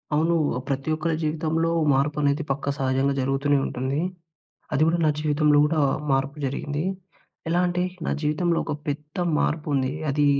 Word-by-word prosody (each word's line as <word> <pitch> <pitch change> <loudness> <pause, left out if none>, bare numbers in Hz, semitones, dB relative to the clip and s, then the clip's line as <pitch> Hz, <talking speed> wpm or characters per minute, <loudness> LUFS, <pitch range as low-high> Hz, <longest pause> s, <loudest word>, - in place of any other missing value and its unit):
అవునూ. 165 +2 +2 0.2
ఆహ్, - - -4
ప్రతి 135 +2 -2
ఒక్కరి 160 +1 -1
జీవితంలో 160 +1 0 0.2
మార్పనేది, 145 +2 +1
పక్కా 140 +1 -2
సహజంగా 135 +1 +1
జరుగుతూనే 135 +2 +1
ఉంటుంది. 130 +3 -2 0.8
అది 150 - +2
గూడా 170 +1 +2
నా 155 - +4
జీవితంలో 150 -1 +3
గూడా 155 0 +1 0.3
మార్పు 135 +2 +1
జరిగింది. 145 +3 -3 0.7
ఎలా 175 +2 +2
అంటే, 180 0 0 0.2
నా - - 0
జీవితంలో 165 +3 +1
ఒక - - -3 0.2
పెద్ద 150 +1 -5 0.2
మార్పుంది. 145 -4 0 0.2
అదీ 145 +1 +2
150 Hz, 145 wpm, -24 LUFS, 140-155 Hz, 0.8 s, నా